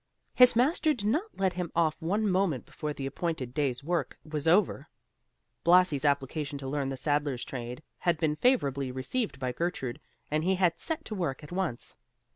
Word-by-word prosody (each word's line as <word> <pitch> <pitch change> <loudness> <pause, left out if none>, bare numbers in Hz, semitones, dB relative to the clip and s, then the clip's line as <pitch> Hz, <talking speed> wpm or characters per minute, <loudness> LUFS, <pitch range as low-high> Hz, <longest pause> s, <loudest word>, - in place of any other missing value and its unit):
His 250 -1 +7
master 300 +5 +3
did 205 - -5
not 330 - -1
let 190 -2 +1
him 180 -1 -4
off 165 -2 +1
one 205 +6 0
moment 185 - +1
before 150 - -5
the 140 -2 -5
appointed 135 -3 -3
day's 135 -3 -1
work 175 +3 -1
was 155 -1 -3
over, 165 -4 +3 0.8
Blasi's 170 -5 +4
application 145 +1 0
to 135 -1 -6
learn 140 0 -1
the 135 - -4
saddler's 145 -2 0
trade 125 -1 -6 0.2
had 170 -2 +1
been 155 -1 +1
favorably 140 - +1
received 200 - -2
by 130 -2 -2
Gertrude 135 -4 -3 0.3
and 155 +1 +1
he 190 +2 +2
had 180 -3 +2
set 320 -1 -3
to - - -5
work 170 -8 -2
at 150 - -11
once. 175 -10 -3
155 Hz, 180 wpm, -29 LUFS, 135-185 Hz, 0.8 s, His